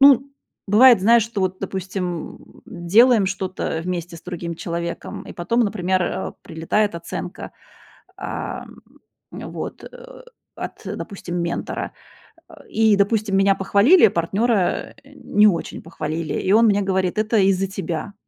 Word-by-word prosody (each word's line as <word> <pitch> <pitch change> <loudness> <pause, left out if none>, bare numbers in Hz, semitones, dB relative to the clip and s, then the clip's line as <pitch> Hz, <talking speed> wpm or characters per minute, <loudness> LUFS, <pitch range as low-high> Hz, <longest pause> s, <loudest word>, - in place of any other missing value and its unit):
Ну, 275 0 +6 0.3
бывает, 230 +2 +7
знаешь, 230 +4 +5
что, 225 -3 -5
вот 185 0 -1
допустим, 185 -3 -5
делаем 210 +5 +3
что-то 185 -3 -3
вместе 175 -1 -4
с 165 - -14
другим 175 -1 -5
человеком, 170 +1 -5
и - - -7
потом, 230 +8 0
например, 190 -4 0
а, - - -3
прилетает 170 +5 -1
оценка. 170 - -6 0.7
А, - - -5 0.6
вот. - - -7
А, - - -13 0.4
от, - - -7
допустим, 180 -3 -6
ментора, 170 0 -3 0.6
а. - - -16
И, 220 -2 +3
допустим, 205 0 +1
меня 195 0 +4
похвалили, 200 - +5
а - - +2
партнёра 195 +4 0
не 275 -7 +1
очень 175 -6 -1
похвалили. 160 0 -4
И 190 - -2
он 225 +2 +6
мне 205 -2 +3
говорит: 190 -1 -1
"Это 220 +1 +1
из-за 195 0 +3
тебя". 185 0 -5
195 Hz, 135 wpm, -21 LUFS, 175-215 Hz, 0.7 s, бывает